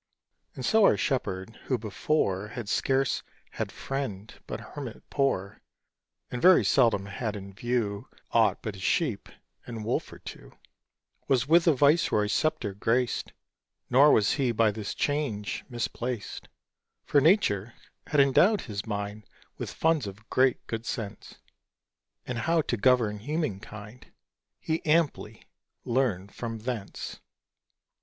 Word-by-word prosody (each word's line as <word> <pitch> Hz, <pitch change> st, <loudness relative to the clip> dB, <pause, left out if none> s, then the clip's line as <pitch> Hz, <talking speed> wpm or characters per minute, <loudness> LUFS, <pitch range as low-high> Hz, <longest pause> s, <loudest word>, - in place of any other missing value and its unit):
And -, -, -5 dB
so 220 Hz, -1 st, +4 dB
our -, -, +5 dB
Shepherd, 115 Hz, -, -2 dB
who 130 Hz, -, +1 dB
before 105 Hz, -2 st, -1 dB
Had 120 Hz, -1 st, -7 dB
scarce 135 Hz, +4 st, +1 dB, 0.3 s
had -, -, -4 dB
friend 115 Hz, -7 st, -5 dB
but -, -, -4 dB
hermit 135 Hz, -6 st, -7 dB
poor, 115 Hz, -9 st, 0 dB, 0.7 s
And 125 Hz, -, -4 dB
very 185 Hz, 0 st, +7 dB
seldom 115 Hz, -7 st, +3 dB
had 105 Hz, +2 st, -4 dB
in 100 Hz, -1 st, -8 dB
view 110 Hz, -2 st, -2 dB, 0.2 s
Aught -, -, +3 dB
but 110 Hz, -, -3 dB
his 95 Hz, -1 st, -9 dB
sheep 125 Hz, -, 0 dB, 0.4 s
and 115 Hz, -3 st, -6 dB
wolf 115 Hz, -, -1 dB
or -, -, -10 dB
two, -, -, -11 dB, 0.7 s
Was 135 Hz, 0 st, +2 dB
with 170 Hz, +3 st, +5 dB
a 165 Hz, -, +7 dB
viceroy's 135 Hz, -8 st, +3 dB
sceptre 120 Hz, -9 st, 0 dB
graced; 115 Hz, +4 st, 0 dB, 0.6 s
Nor 140 Hz, +4 st, +7 dB
was 105 Hz, -, +4 dB
he 135 Hz, -5 st, +1 dB
by 115 Hz, -1 st, +3 dB
this 105 Hz, -1 st, -5 dB
change 140 Hz, -9 st, -2 dB
misplaced, 120 Hz, -1 st, -4 dB, 0.6 s
For 145 Hz, -, +4 dB
Nature 120 Hz, -, +3 dB, 0.3 s
had 150 Hz, -, +1 dB
endowed 175 Hz, +10 st, +5 dB
his 105 Hz, -2 st, -6 dB
mind 105 Hz, 0 st, -4 dB, 0.3 s
With -, -, -4 dB
funds 160 Hz, -8 st, +1 dB
of 100 Hz, +3 st, -11 dB
great 130 Hz, -1 st, +2 dB
good 115 Hz, +1 st, -5 dB
sense; 105 Hz, -3 st, -5 dB, 0.9 s
And 125 Hz, -2 st, -3 dB
how 165 Hz, +6 st, +2 dB
to 120 Hz, -, -1 dB
govern 115 Hz, -2 st, +3 dB
human 150 Hz, -, -2 dB
kind 105 Hz, +3 st, -11 dB, 0.5 s
He 160 Hz, 0 st, -2 dB
amply 150 Hz, -9 st, +1 dB, 0.4 s
learned 115 Hz, -6 st, 0 dB
from 115 Hz, -1 st, -5 dB
thence. 110 Hz, -3 st, -5 dB
120 Hz, 135 wpm, -28 LUFS, 105-140 Hz, 0.9 s, very